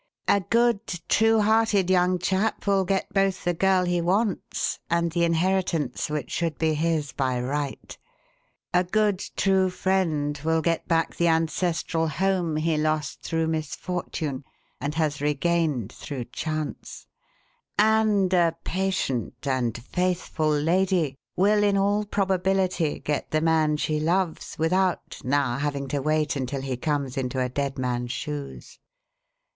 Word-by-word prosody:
A 200 Hz, -, +4 dB
good, 235 Hz, +2 st, +2 dB, 0.3 s
true 225 Hz, 0 st, +4 dB
hearted 210 Hz, -3 st, +3 dB
young 180 Hz, 0 st, +3 dB
chap 190 Hz, +4 st, -1 dB
will 195 Hz, -2 st, +2 dB
get 195 Hz, +1 st, -1 dB
both 195 Hz, -1 st, +1 dB
the 175 Hz, -, +1 dB
girl 190 Hz, +1 st, +3 dB
he 175 Hz, -1 st, +1 dB
wants 195 Hz, +4 st, 0 dB
and 170 Hz, 0 st, +1 dB
the 170 Hz, +1 st, +1 dB
inheritance 165 Hz, -5 st, 0 dB
which 150 Hz, -4 st, -3 dB
should 165 Hz, -4 st, -1 dB
be 160 Hz, -1 st, +1 dB
his 155 Hz, -2 st, 0 dB
by 130 Hz, -2 st, -1 dB
right; 140 Hz, +3 st, -3 dB, 0.8 s
a 180 Hz, 0 st, +4 dB
good, 205 Hz, +1 st, +1 dB, 0.2 s
true 190 Hz, -1 st, +3 dB
friend 160 Hz, -6 st, 0 dB
will 160 Hz, 0 st, +1 dB
get 165 Hz, -1 st, 0 dB
back 165 Hz, -1 st, +1 dB
the 170 Hz, -, +2 dB
ancestral 165 Hz, 0 st, 0 dB
home 180 Hz, -1 st, 0 dB
he 155 Hz, 0 st, +1 dB
lost 155 Hz, -1 st, -1 dB
through 165 Hz, 0 st, -1 dB
misfortune 160 Hz, -2 st, -3 dB, 0.4 s
and 145 Hz, +2 st, -3 dB
has 150 Hz, -3 st, 0 dB
regained 150 Hz, -, 0 dB
through 130 Hz, -3 st, -6 dB
chance, 155 Hz, +1 st, -5 dB, 0.7 s
and 215 Hz, -3 st, +3 dB
a 170 Hz, -2 st, +3 dB
patient 165 Hz, -10 st, -2 dB
and 125 Hz, -4 st, 0 dB
faithful 180 Hz, -1 st, -1 dB
lady 165 Hz, 0 st, +1 dB, 0.2 s
will, 205 Hz, +3 st, +3 dB
in 200 Hz, -1 st, +3 dB
all 205 Hz, +2 st, +1 dB
probability, 190 Hz, -4 st, 0 dB
get 150 Hz, -2 st, -2 dB
the 155 Hz, -, +1 dB
man 155 Hz, -1 st, +2 dB
she 155 Hz, 0 st, -1 dB
loves 170 Hz, +2 st, -1 dB
without 180 Hz, +3 st, 0 dB
now 135 Hz, -1 st, +1 dB
having 140 Hz, -1 st, -2 dB
to 145 Hz, -, -1 dB
wait 155 Hz, -1 st, +1 dB
until 135 Hz, 0 st, -3 dB
he 135 Hz, -1 st, -3 dB
comes 140 Hz, 0 st, -2 dB
into 130 Hz, 0 st, -2 dB
a 125 Hz, 0 st, 0 dB
dead 140 Hz, +1 st, -2 dB
man's 125 Hz, -1 st, -2 dB
shoes. 145 Hz, 0 st, -6 dB
165 Hz, 140 wpm, -25 LUFS, 145-190 Hz, 0.8 s, A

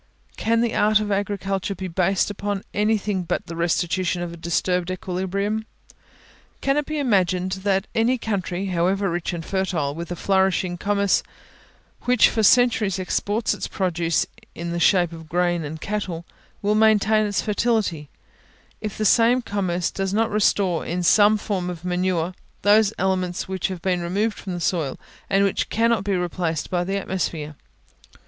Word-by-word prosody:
Can 230 Hz, +1 st, +1 dB
the 235 Hz, -1 st, 0 dB
art 215 Hz, +1 st, +4 dB
of 210 Hz, -1 st, -2 dB
agriculture 195 Hz, -1 st, -1 dB
be 190 Hz, +1 st, -5 dB
based 185 Hz, +3 st, +1 dB
upon 205 Hz, -1 st, -3 dB
anything 210 Hz, -2 st, +1 dB
but 175 Hz, -, -2 dB
the 165 Hz, -, -7 dB
restitution 175 Hz, +1 st, 0 dB
of 170 Hz, -1 st, -5 dB
a -, -, -7 dB
disturbed 170 Hz, +1 st, -1 dB
equilibrium? 195 Hz, +4 st, -2 dB, 0.9 s
Can 275 Hz, 0 st, +1 dB
it 295 Hz, -1 st, 0 dB
be 310 Hz, -, -3 dB
imagined 185 Hz, -, +1 dB
that 195 Hz, 0 st, +1 dB
any 235 Hz, +3 st, +2 dB
country, 195 Hz, -4 st, -2 dB
however 190 Hz, +1 st, +1 dB
rich 175 Hz, +1 st, -2 dB
and 170 Hz, -2 st, -5 dB
fertile, 180 Hz, -7 st, -1 dB
with 170 Hz, +3 st, -6 dB
a 175 Hz, -, -3 dB
flourishing 190 Hz, -1 st, +1 dB
commerce, 200 Hz, +2 st, +1 dB, 0.8 s
which 250 Hz, -2 st, +5 dB
for 220 Hz, -, 0 dB
centuries 220 Hz, -3 st, +4 dB
exports 205 Hz, +4 st, 0 dB
its -, -, -4 dB
produce 170 Hz, -3 st, 0 dB, 0.3 s
in 170 Hz, 0 st, -4 dB
the 170 Hz, -, -2 dB
shape 175 Hz, -1 st, +4 dB
of 160 Hz, -1 st, -10 dB
grain 175 Hz, -1 st, +1 dB
and 155 Hz, +2 st, -6 dB
cattle, 185 Hz, -4 st, -4 dB, 0.4 s
will 205 Hz, +1 st, +2 dB
maintain 215 Hz, 0 st, +4 dB
its 205 Hz, -, -1 dB
fertility, 210 Hz, -9 st, 0 dB, 0.7 s
if 215 Hz, -2 st, -5 dB
the 215 Hz, -, -1 dB
same 240 Hz, +4 st, +4 dB
commerce 185 Hz, -5 st, -1 dB
does 195 Hz, 0 st, -2 dB
not 225 Hz, +1 st, +1 dB
restore, 200 Hz, -4 st, +2 dB
in 175 Hz, +2 st, -2 dB
some 210 Hz, +4 st, +5 dB
form 195 Hz, -4 st, -2 dB
of 175 Hz, -1 st, -7 dB
manure, 180 Hz, -1 st, 0 dB, 0.3 s
those 210 Hz, 0 st, +5 dB
elements 185 Hz, -1 st, -1 dB
which 190 Hz, -1 st, -2 dB
have 185 Hz, -3 st, -6 dB
been 180 Hz, -2 st, +1 dB
removed 205 Hz, +6 st, -1 dB
from 190 Hz, -, -5 dB
the -, -, -4 dB
soil, 165 Hz, -5 st, -1 dB, 0.3 s
and 195 Hz, 0 st, +3 dB
which 195 Hz, -, 0 dB
cannot 230 Hz, -2 st, +2 dB
be 200 Hz, -1 st, 0 dB
replaced 175 Hz, -3 st, -2 dB
by 175 Hz, -1 st, +1 dB
the 195 Hz, +2 st, -2 dB
atmosphere? 165 Hz, -6 st, -3 dB
190 Hz, 165 wpm, -23 LUFS, 175-210 Hz, 0.9 s, which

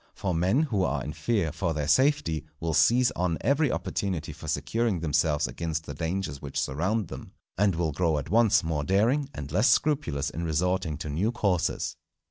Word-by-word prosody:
For 95 Hz, -2 st, -2 dB
men 95 Hz, -, +2 dB
who 105 Hz, -11 st, 0 dB
are -, -, -1 dB
in 75 Hz, -, -5 dB
fear 85 Hz, +1 st, 0 dB
for 85 Hz, 0 st, -2 dB
their 75 Hz, -1 st, -2 dB
safety 130 Hz, -, +2 dB, 0.2 s
will 80 Hz, -1 st, -2 dB
seize 125 Hz, +9 st, +4 dB
on 90 Hz, -2 st, -1 dB
every 140 Hz, +1 st, +2 dB
opportunity 90 Hz, -6 st, -3 dB
for 80 Hz, -, -10 dB
securing 110 Hz, +5 st, 0 dB
themselves 75 Hz, -1 st, +1 dB
against 80 Hz, -1 st, -3 dB
the 70 Hz, -, -6 dB
dangers 80 Hz, -1 st, -3 dB
which 70 Hz, -2 st, -4 dB
surround 95 Hz, +8 st, -1 dB
them, -, -, -9 dB, 0.2 s
and 100 Hz, -2 st, +2 dB
will 80 Hz, -2 st, 0 dB
grow 80 Hz, 0 st, +1 dB
at 75 Hz, +3 st, -5 dB
once 110 Hz, -1 st, +4 dB
more 80 Hz, -3 st, -1 dB
daring, 115 Hz, -, +2 dB
and 70 Hz, 0 st, -6 dB
less 95 Hz, -, +3 dB
scrupulous 135 Hz, -, +1 dB
in 85 Hz, -, -4 dB
resorting 85 Hz, 0 st, 0 dB
to 75 Hz, -, -6 dB
new 90 Hz, +10 st, 0 dB
courses. 100 Hz, -8 st, -1 dB
90 Hz, 185 wpm, -27 LUFS, 80-110 Hz, 0.2 s, seize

